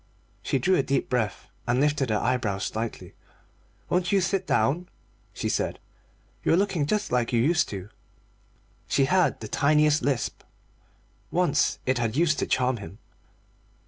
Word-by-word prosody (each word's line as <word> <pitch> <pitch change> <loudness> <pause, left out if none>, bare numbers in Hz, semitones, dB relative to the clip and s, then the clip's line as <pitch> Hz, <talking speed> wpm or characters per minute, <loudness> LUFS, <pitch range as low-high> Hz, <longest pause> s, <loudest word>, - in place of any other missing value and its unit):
She - - 0
drew 185 +6 +2
a - - +4
deep 135 0 -1
breath, 110 -5 -1 0.2
and 120 +1 +2
lifted 145 -2 +1
her 105 - +2
eyebrows 110 -5 -1
slightly. 110 +1 -5 0.7
"Won't 180 0 0
you 200 - +4
sit 190 0 -1
down?" 175 +6 +1 0.4
she - - -4
said; - - -1 0.7
"you - - +2
are - - +4
looking 185 -7 +1
just 210 +6 -1
like 120 -2 +1
you 120 - +2
used 160 +6 +2
to." 95 -2 -6 1.0
She 135 +1 +2
had 185 +5 +2
the 110 - -5
tiniest 150 +4 +3
lisp; 135 -4 -1 0.9
once - - +1
it 130 -1 +1
had 115 -1 -1
used 155 -3 +2
to - - -1
charm 130 -1 +1
him. 100 -1 -10
135 Hz, 155 wpm, -26 LUFS, 120-170 Hz, 1.0 s, a